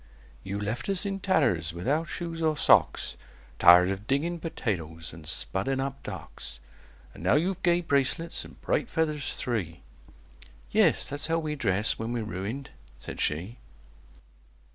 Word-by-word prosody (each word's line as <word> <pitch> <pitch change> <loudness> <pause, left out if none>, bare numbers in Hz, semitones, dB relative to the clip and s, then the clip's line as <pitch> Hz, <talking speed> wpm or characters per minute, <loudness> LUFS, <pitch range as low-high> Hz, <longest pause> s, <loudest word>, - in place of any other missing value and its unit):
"You 100 +1 -4
left 110 - -3
us 195 0 +3
in 195 -1 -2
tatters, 90 - +1
without 140 - 0
shoes 165 0 -5
or 155 -2 +1
socks, - - +3 0.4
Tired 90 +2 +8
of 100 +2 -5
digging 165 +6 0
potatoes, 80 - -4
and 80 -1 -11
spudding 95 - 0
up 135 0 -3
docks; - - -8 0.5
And - - -12
now 95 +7 +3
you've 185 +5 0
gay 175 -1 +3
bracelets 160 +2 0
and - - -14
bright - - 0
feathers 150 -3 -1
three!" 95 -10 -3 0.9
"Yes: - - +4
that's 145 +1 0
how 165 0 +1
we 155 -2 -2
dress 105 -7 +1
when 115 +1 -3
we're 120 -2 -2
ruined," 105 +8 -5 0.3
said - - -7
she. 90 +11 -2
125 Hz, 145 wpm, -28 LUFS, -, 0.9 s, Tired